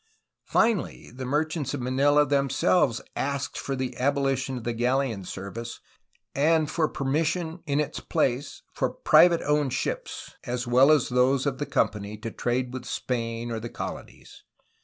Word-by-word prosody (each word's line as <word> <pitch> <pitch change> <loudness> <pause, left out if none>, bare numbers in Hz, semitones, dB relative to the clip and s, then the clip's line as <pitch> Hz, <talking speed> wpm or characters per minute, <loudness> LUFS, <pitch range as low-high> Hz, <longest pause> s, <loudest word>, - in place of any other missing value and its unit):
Finally, 220 -4 +1
the 130 +1 -6
merchants 150 0 -1
of - - -5
Manila 140 +4 +3
themselves 140 -1 +2
asked 140 0 -2
for 135 - -3
the 130 -1 -3
abolition 135 -1 0
of 120 - -7
the 120 - -2
galleon 120 -3 0
service 100 +6 -7 0.5
and 155 +1 +2
for 160 -2 +1
permission 160 +5 -1
in 140 0 +1
its 150 0 -2
place 140 -4 -1
for - - 0
private 170 -1 +5
owned 150 -3 +1
ships, - - -4
as 125 0 -3
well 130 +4 +5
as 150 -5 +3
those 130 +2 +2
of 140 -2 -1
the 145 - -2
Company, 105 0 -1
to 115 +1 -6
trade 125 +2 -1
with 130 -1 -6
Spain 115 -2 -3
or 115 - -2
the 115 +1 -6
colonies. - - -8
135 Hz, 155 wpm, -26 LUFS, 120-145 Hz, 0.5 s, private